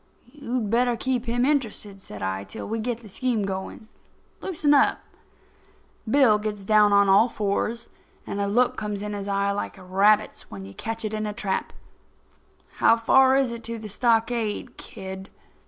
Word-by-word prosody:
"You'd 245 -7 -3
better 240 0 +2
keep 255 -1 -1
him 245 +2 +1
interested," 220 -8 -2
said 105 - -9
I, 95 +1 -2
"till 95 - -8
we 225 +1 -2
get 235 +1 -3
the 220 - -13
scheme 235 +1 -1
going. 190 +3 -6 0.5
Loosen 310 -5 +1
up." 280 - +4 1.1
Bill 230 -5 +5
gets 210 -2 -5
down 210 0 +5
on 200 0 +5
his 195 - +3
all 215 +5 +5
fours, 215 +2 -2 0.4
and 200 - -3
a 200 - 0
look 245 +4 +2
comes 210 -1 -4
in 210 0 -4
his 200 -1 -5
eye 200 0 0
like 200 +1 -4
a 190 - -13
rabbit's 195 +3 +2
when 95 -1 -8
you 100 - -11
catch 225 - -4
it 215 - -3
in 215 0 -2
a 210 - -4
trap. 195 -2 -2 1.1
"How 230 - +5
far 265 +3 +5
is 270 -3 +2
it 235 0 -7
to 230 0 -4
the 215 -1 -8
stockade, 225 0 0
kid?" 190 0 -8
215 Hz, 180 wpm, -25 LUFS, 200-240 Hz, 1.1 s, Bill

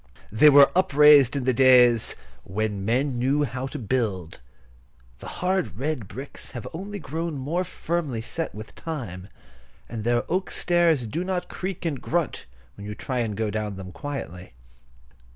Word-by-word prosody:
They 110 +8 +7
were 140 -1 +7
upraised 150 -6 +6
in 140 - -1
the 130 0 +2
days 125 -2 +5 0.3
"when 105 +1 -3
men 125 +4 0
knew 140 +4 +2
how 130 0 -3
to 145 - -6
build." 105 - -2 0.8
The - - -9
hard 185 0 -2
red 135 -6 -3
bricks 135 +9 -7
have 115 - -6
only 200 +5 -6
grown 165 -2 -4
more 155 +7 -1
firmly 160 -9 -3
set 165 +3 -4
with 110 +1 -9
time, 110 - -6 0.6
and 115 -2 -6
their 120 +1 +1
oak 185 +2 -1
stairs 170 -7 +2
do 155 +11 -3
not 185 -1 -3
creak 185 -2 -5
and 145 -6 -2
grunt 170 -2 -2 0.3
when 100 0 -10
you 105 - -5
try 125 +1 -3
to 115 -2 -2
go 110 0 -2
down 105 -2 -3
them 95 -1 -8
quietly. 90 - -7
130 Hz, 160 wpm, -25 LUFS, 110-160 Hz, 0.8 s, They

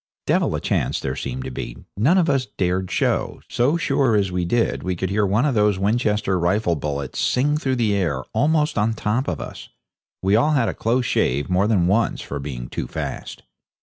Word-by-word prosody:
Devil - - +1
a - - -1
chance - - 0
there 65 -1 -3
seemed 65 -1 -4
to 65 - -5
be; - - -6 0.2
none 140 - +3
of 175 -3 +3
us 135 -4 +1
dared 90 0 0
show. - - 0
So 135 +7 +2
sure 135 -8 +2
as 100 -3 +1
we 90 -1 -1
did 115 +6 0
we 95 -1 -2
could 95 +2 -3
hear 105 0 +2
one 105 +8 +2
of 145 - +1
those 105 -3 +3
Winchester 105 -2 +1
rifle 90 +1 +1
bullets 70 -2 -4
sing 145 +4 +2
through 135 -4 0
the 115 -4 +1
air, 80 -10 0
almost 150 -4 +2
on 105 +2 +2
the - - -11
top 110 +6 0
of 80 - -2
us. - - -8 0.5
We 95 +2 +3
all 150 +8 +3
had 125 -6 +2
a - - -3
close 120 +3 0
shave 70 - 0
more 95 +3 +3
than 100 -6 +2
once 105 +6 +1
for 70 - -5
being 65 -4 -6
too - - -4
fast. - - -6
105 Hz, 215 wpm, -22 LUFS, 90-120 Hz, 0.5 s, none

